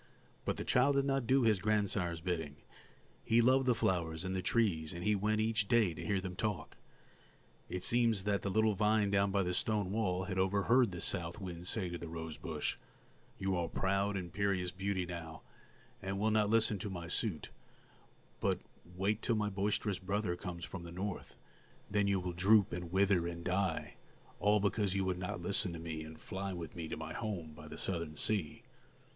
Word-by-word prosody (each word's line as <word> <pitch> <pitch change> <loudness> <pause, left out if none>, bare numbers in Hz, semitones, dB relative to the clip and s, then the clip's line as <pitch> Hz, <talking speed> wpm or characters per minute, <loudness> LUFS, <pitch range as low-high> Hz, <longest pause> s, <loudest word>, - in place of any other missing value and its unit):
But - - -1
the - - -4
child 135 +3 +4
did 140 0 +3
not 135 -3 0
do 130 +1 +4
his 110 -4 +4
grandsire's 100 -5 +1
bidding; 80 -5 -2 0.7
he 115 - +4
loved 130 +2 +4
the 125 - +4
flowers 85 -4 0
and 95 0 -2
the 95 - 0
trees, 90 -6 +1
and 85 0 -6
he 105 - +3
went 105 +2 +1
each 110 -1 +1
day 110 -7 +4
to - - -7
hear 100 -2 +1
them 95 -1 -5
talk. 105 -1 -2 0.9
It 90 0 -4
seems 115 -4 +3
that 100 -1 +1
the 100 - -2
little 110 +2 +3
vine 105 0 +2
down 100 0 +3
by 100 0 +2
the 90 0 -1
stone 105 0 0
wall 95 -4 0
had 95 0 -2
overheard 100 +6 +4
the 90 - -6
south 85 +4 0
wind 90 -2 -6
say 100 -3 0
to 85 0 -5
the 85 - -6
rose 80 -1 -5
bush: - - -3 0.6
"You 95 -1 0
are 85 -1 0
a - - -6
proud, 100 +1 0
imperious 90 +1 -1
beauty 95 0 -1
now, 85 -2 -7 0.6
and 95 +1 -3
will 110 +2 +2
not 105 -1 +3
listen 110 -2 +3
to 105 - -4
my 85 -3 -5
suit; 90 -1 -1 0.9
but - - +1 0.4
wait 100 +4 0
till 115 - +1
my 105 -1 0
boisterous 100 0 0
brother 100 -1 -1
comes 90 -2 -6
from 95 - -7
the 85 0 -8
North, 95 +2 -5 0.6
then 105 -1 +2
you 100 -1 +2
will 90 -1 -3
droop 100 +3 +4
and 85 -1 -5
wither 95 -2 +3
and 85 0 -6
die, 90 -2 -1 0.4
all 105 +2 +4
because 100 -1 +1
you 95 -1 +1
would 90 -1 -1
not 90 -1 -4
listen 95 +1 0
to 85 - -6
me 80 -1 -5
and 80 0 -9
fly 95 0 -4
with 85 -3 -6
me 85 -2 -4
to - - -4
my 80 0 -6
home 95 -9 -4
by 75 0 -11
the - - -8
Southern 85 -4 -1
sea." 90 0 0
95 Hz, 200 wpm, -34 LUFS, 85-105 Hz, 0.9 s, child